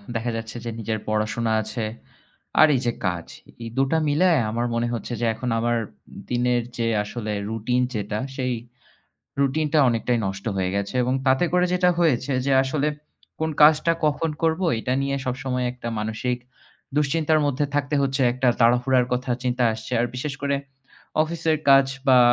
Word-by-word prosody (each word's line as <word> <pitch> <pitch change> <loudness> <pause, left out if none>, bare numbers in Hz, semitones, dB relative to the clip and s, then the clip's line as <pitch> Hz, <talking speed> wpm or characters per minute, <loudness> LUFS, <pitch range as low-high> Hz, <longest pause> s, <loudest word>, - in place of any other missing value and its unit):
দেখা 120 +1 -1
যাচ্ছে 115 +1 -6
যে - - -2
নিজের 110 -1 -2
পড়াশোনা 110 +2 0
আছে 110 +1 -4 0.7
আর 155 - +9
এই - - +1
যে 120 - +2 0.2
কাজ, 90 -2 -2 0.4
এই 115 - -5
দু'টা 135 +4 +2
মিলায় 155 0 +3
আমার 120 +2 -1
মনে 120 0 0
হচ্ছে 120 +1 -4
যে - - +1
এখন 125 +3 -4
আমার 120 +1 +1 0.5
দিনের 125 0 +1 0.2
যে 115 - 0 0.2
আসলে 105 0 -4 0.2
routine 125 +3 0
যেটা 105 0 -2 0.2
সেই 130 -2 -1 0.9
routine 150 +3 +1
টা - - +6
অনেকটাই 120 +1 +1
নষ্ট 95 +1 -5
হয়ে 95 -1 0
গেছে 100 +4 -3
এবং 125 +1 0
তাতে 130 +5 +4
করে 180 0 +3
যেটা 180 0 +3
হয়েছে 140 -5 +2
যে 140 - +2
আসলে 140 +2 0 0.5
কোন 160 0 0
কাজটা 155 +2 +6
কখন 155 +2 +1
করব 160 +1 +2 0.2
এটা 125 +3 -2
নিয়ে 140 0 -1
সব 125 - 0
সময় 125 -2 -1
একটা 125 -1 -7
মানসিক 110 +3 -2 0.6
দুশ্চিন্তার 155 +1 +2
মধ্যে 145 +1 0
থাকতে 145 0 0
হচ্ছে। 135 0 0
একটা 130 +1 +1
তাড়াহুড়ার 125 +1 +4
কথা 125 0 -1
চিন্তা 125 -1 0
আসছে। 110 +2 -8
আর 120 - +2
বিশেষ 135 +2 -3
করে 140 0 +1 0.7
অফিসের 160 0 0
কাজ 135 0 +7 0.2
বা 130 -1 +7
125 Hz, 170 wpm, -23 LUFS, 115-145 Hz, 0.9 s, আর